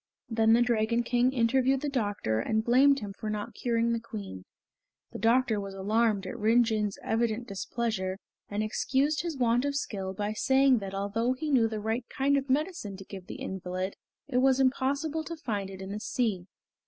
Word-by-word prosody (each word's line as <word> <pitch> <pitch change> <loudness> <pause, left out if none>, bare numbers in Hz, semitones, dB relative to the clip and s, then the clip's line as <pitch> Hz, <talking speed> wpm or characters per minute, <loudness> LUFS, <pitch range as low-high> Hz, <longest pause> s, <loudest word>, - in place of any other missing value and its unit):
Then 225 0 +4
the 240 +1 +5
Dragon 235 0 +1
King 245 +2 +2
interviewed 260 +2 +2
the 295 - -2
doctor 205 - -1
and 220 - 0
blamed 270 +4 +5
him 200 -2 -6
for 215 +2 -5
not 210 +2 -4
curing 235 +1 0
the 230 - 0
Queen. 205 - -8 0.7
The - - -7
doctor 230 -1 +3
was 195 -1 -6
alarmed 210 +1 +1
at 185 - -6
Rin 230 +3 +4
Jin's 215 -3 -1
evident 230 +1 0
displeasure, 195 -2 -2 0.3
and 205 +1 -1
excused 275 +7 +1
his 335 -4 -4
want 240 0 +2
of 285 0 -1
skill 195 -8 -3
by 210 +2 -2
saying 265 +2 +4
that 195 -1 -6
although 220 +5 0
he 300 +4 -4
knew 240 -5 +4
the 220 -1 -4
right 225 +3 -2
kind 280 +1 +1
of 275 0 -1
medicine 280 - -1
to 195 - -10
give 190 -2 -9
the - - -7
invalid, 185 0 -4 0.3
it 260 -3 -1
was 260 +1 +4
impossible 280 +4 +1
to 335 - -6
find 205 -10 -3
it 190 -1 -9
in 190 - -6
the 210 - -4
sea. 210 -6 -1
230 Hz, 190 wpm, -29 LUFS, 205-260 Hz, 0.7 s, the